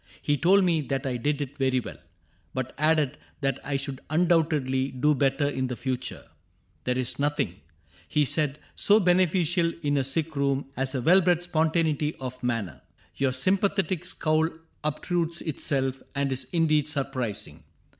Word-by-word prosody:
He 145 - +1
told 190 +7 +4
me 170 -3 +2
that 135 0 -3
I 130 -2 -1
did 145 +4 0
it 145 +1 -10
very 130 -1 +2
well. - - -8 0.6
But 130 -1 -3
added 155 -2 +2 0.2
that 135 -1 0
I 145 - -2
should 135 -1 -5
undoubtedly 155 -5 +2
Do 140 +3 +2
better 140 +1 +1
in 130 -2 -1
the 125 - -4
future: 125 0 -4 0.3
" - - -40
There 125 0 0
is 130 +1 -2
nothing, 140 -10 -1 0.5
He 150 -1 +2
said, 145 0 0
^^ - - -23 0.2
so 210 +1 +5
beneficial 175 -2 +3
in 145 -1 +1
a 135 - +2
sick 155 +4 -1
room 140 -1 0
As 130 +1 -1
a 125 - -1
well 185 +6 +6
bred 175 -1 +2
spontaneity 160 -2 +1
of 130 -1 -7
manner. 115 - -2 0.4
Your 135 -1 +2
sympathetic 190 +4 +1
scowl 160 -3 +1 0.3
obtrudes 170 +2 -1
itself. 135 -4 -1
And 140 -1 0
is 130 0 -1
indeed 155 -3 +2
surprising. 130 - -4
145 Hz, 165 wpm, -27 LUFS, 130-165 Hz, 0.6 s, well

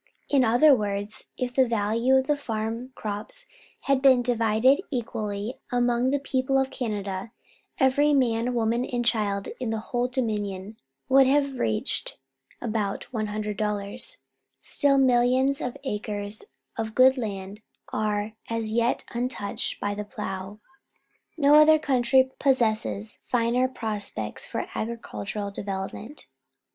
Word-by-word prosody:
In 275 -3 +4
other 250 +6 +6
words, 205 -2 -2
if 250 -1 -2
the 260 0 +4
value 230 +3 +2
of 265 0 +3
the 295 - +2
farm 230 -1 -4
crops 215 - -6 0.4
had 275 -1 +2
been 260 -3 +6
divided 235 - +3
equally 215 -3 -4
among 245 0 +2
the 285 - +2
people 270 -1 0
of 265 0 +1
Canada, 205 -4 -4 0.5
every 285 +3 +3
man, 245 -3 +1
woman, 235 +1 +1
and 245 -1 -2
child 205 -4 0
in 250 -3 -2
the 225 - -1
whole 240 +3 -1
Dominion 210 -5 -3 0.3
would 270 0 +6
have 275 -1 +1
received 110 -1 -1 0.4
about 215 -4 -2
$100. 210 - -3 0.4
Still 280 -2 +2
millions 260 +1 +3
of 250 - -4
acres 210 - -4 0.3
of 220 -1 -3
good 260 +1 +6
land 205 -4 -5 0.3
are 210 0 -1 0.2
as 225 -1 -2
yet 235 +2 +1
untouched 235 -4 -3
by 205 - -1
the 210 +1 -4
plough. 205 -1 -6 0.8
No 290 -1 +5
other 310 +1 +7
country 260 -3 +3
possesses 215 - 0
finer 245 +1 +1
prospects 215 -5 -4
for - - -3
agricultural 210 - -4
development. 200 +7 -6
230 Hz, 125 wpm, -26 LUFS, 210-260 Hz, 0.8 s, other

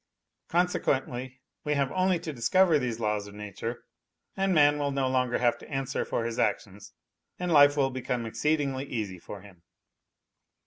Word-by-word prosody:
Consequently 130 -7 -1 0.2
we 150 -1 0
have 140 -2 0
only 185 -1 +2
to 165 -2 -6
discover 155 +7 +3
these 120 -3 -3
laws 105 -2 -1
of 100 - -12
nature, 105 +3 -6 0.5
and 195 0 +1
man 145 -3 +4
will 145 -1 0
no 135 -1 0
longer 125 -1 +1
have 120 -1 +1
to - - -13
answer 135 -1 -2
for 115 - -2
his 115 -1 -3
actions 100 -1 -2 0.4
and 180 -1 -2
life 145 -1 +6
will 135 -2 +2
become 125 -2 -3
exceedingly 140 +2 -1
easy 105 -9 -4
for 100 +3 -9
him. 95 -4 -16
130 Hz, 165 wpm, -28 LUFS, 115-150 Hz, 0.5 s, life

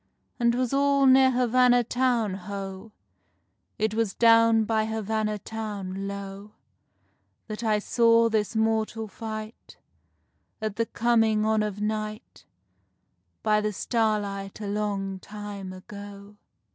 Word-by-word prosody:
And 235 -1 +3
'twas 250 +1 -1
all 280 0 +3
near 265 0 +6
Havanna 250 0 +3
town, 245 -4 0
ho! 195 +2 -7 0.9
It 220 -1 0
was 220 -3 -1
down 230 -1 +5
by 220 0 0
Havanna 220 -1 -1
town, 200 -3 -5
low, 200 +1 -7 0.9
That 215 +1 -6
I 215 -2 +2
saw 230 +2 +3
this 220 0 -1
mortal 220 0 0
fight, 215 +1 -8 0.8
At 215 -2 -4
the 230 0 0
coming 225 -2 +2
on 220 0 +2
of 210 -1 -3
night, 215 +1 -4 1.0
By 215 -1 +3
the 210 0 -1
starlight 205 -3 -1
a 210 - -5
long 200 -2 -2
time 205 -2 -8
ago. 200 +2 -11
215 Hz, 120 wpm, -26 LUFS, 205-230 Hz, 1.0 s, near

